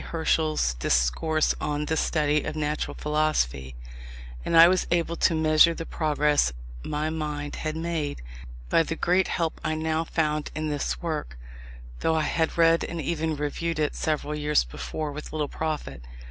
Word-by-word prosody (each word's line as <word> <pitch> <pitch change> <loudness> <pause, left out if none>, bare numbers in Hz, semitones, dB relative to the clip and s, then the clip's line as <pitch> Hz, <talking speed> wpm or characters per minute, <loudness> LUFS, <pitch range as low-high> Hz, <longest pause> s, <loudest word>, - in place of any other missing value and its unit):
Herschel's 155 - 0
Discourse 65 - +1
on 150 0 -1
the 160 - -1
Study 150 -1 +1
of - - -4
Natural 150 0 -2
Philosophy: 70 - 0 0.7
and 165 - +2
I 165 +1 +10
was 185 0 +2
able 170 -1 +1
to 170 - +3
measure 160 +1 +5
the 165 - -5
progress 150 - +1 0.3
my 150 +1 -2
mind 150 -2 -4
had 155 -1 -3
made, 160 - -3 0.4
by 165 - +4
the 165 0 -2
great 180 +3 +2
help 165 -2 -2
I 155 0 0
now 160 +1 0
found 155 -2 -1
in 155 0 -2
this 65 - -2
work 60 +1 -3 0.6
though 160 - +1
I 160 - +1
had 160 +1 0
read 165 0 +4
and 170 - -4
even 160 -1 -1
reviewed 150 +3 -2
it 150 -1 0
several 150 -1 -1
years 150 0 +2
before 145 - -5
with 150 +1 -8
little 155 -2 -1
profit. 155 - -4
155 Hz, 160 wpm, -26 LUFS, 150-160 Hz, 0.7 s, I